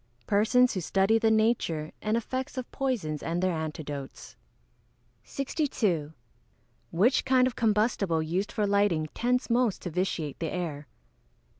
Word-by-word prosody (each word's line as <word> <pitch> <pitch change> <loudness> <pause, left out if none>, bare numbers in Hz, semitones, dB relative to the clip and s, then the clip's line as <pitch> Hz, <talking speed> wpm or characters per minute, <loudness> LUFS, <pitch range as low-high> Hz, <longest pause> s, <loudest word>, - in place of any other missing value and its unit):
_ - - -41
Persons 245 +5 +3
who 185 - -2
study 195 +6 +2
the 225 - +3
nature 220 -9 +1
and 215 +2 0
effects 260 +3 -4
of 255 - -5
poisons 220 - -2
and 170 +1 -2
their 185 0 +1
antidotes. 150 -3 -6 0.9
62. 220 - -1 0.8
_Which 210 +10 +3
kind 260 -1 +4
of 255 - -1
combustible 210 -6 +1
used 180 +6 -2
for 210 - 0
lighting 200 -6 +1
tends 250 +2 0
most 235 -4 +1
to 175 - -4
vitiate 160 -4 -2
the 165 -2 -3
air? 155 -5 -4
200 Hz, 140 wpm, -28 LUFS, 165-235 Hz, 0.9 s, kind